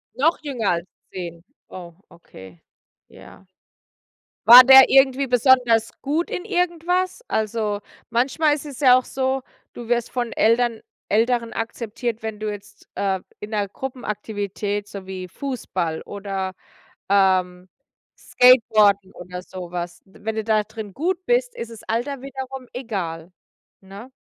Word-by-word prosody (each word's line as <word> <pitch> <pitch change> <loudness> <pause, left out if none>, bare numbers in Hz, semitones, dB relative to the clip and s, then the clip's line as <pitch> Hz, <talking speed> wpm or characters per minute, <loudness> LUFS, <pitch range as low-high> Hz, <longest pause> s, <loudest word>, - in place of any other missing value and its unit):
Noch 300 +7 +2
jünger 250 - -1
als 170 +1 -2 0.2
10? 170 -2 -7 0.3
Oh, 175 -2 -10 0.2
okay. 95 - -15 0.5
Ja. 195 - -16 1.0
War 245 +2 +11
der 265 0 +9
irgendwie 270 0 +4
besonders 245 -3 +3
gut 305 +5 -1
in 360 - -4
irgendwas? 360 0 -1
Also, 215 -1 -1 0.3
manchmal 280 +6 +2
ist 295 - -7
es 280 -2 -9
ja 255 -3 +7
auch 255 - -4
so, 265 0 -2 0.3
du 235 -1 -9
wirst 240 -1 0
von 240 -2 -3
Ältern 230 0 +2 0.3
Älteren 230 +2 +1
akzeptiert, 230 0 -4
wenn 220 -1 -5
du 215 0 -3
jetzt, 205 0 -11
äh, 190 -2 -1 0.2
in 210 - -8
'ner 210 -2 -1
Gruppenaktivität 205 -4 -4
so 195 -2 -9
wie 185 -1 -6
Fußball 180 - -4
oder, 195 -2 -5 0.6
ähm, 185 -2 +2 0.5
Skateboarden 215 -6 +4
oder 180 0 -8
so 180 -1 -9
was 175 0 -6
w 190 - -21
wenn 220 0 -2
du 220 - -2
da 215 -1 +2
drin 215 -2 -9
gut 360 +5 -2
bist, - - +1
isses 230 -1 -8
Alter 250 +4 -3
wiederum 265 -1 -7
egal, 185 -9 -5 0.5
ne? 200 +6 -12
225 Hz, 135 wpm, -22 LUFS, 195-260 Hz, 1.0 s, War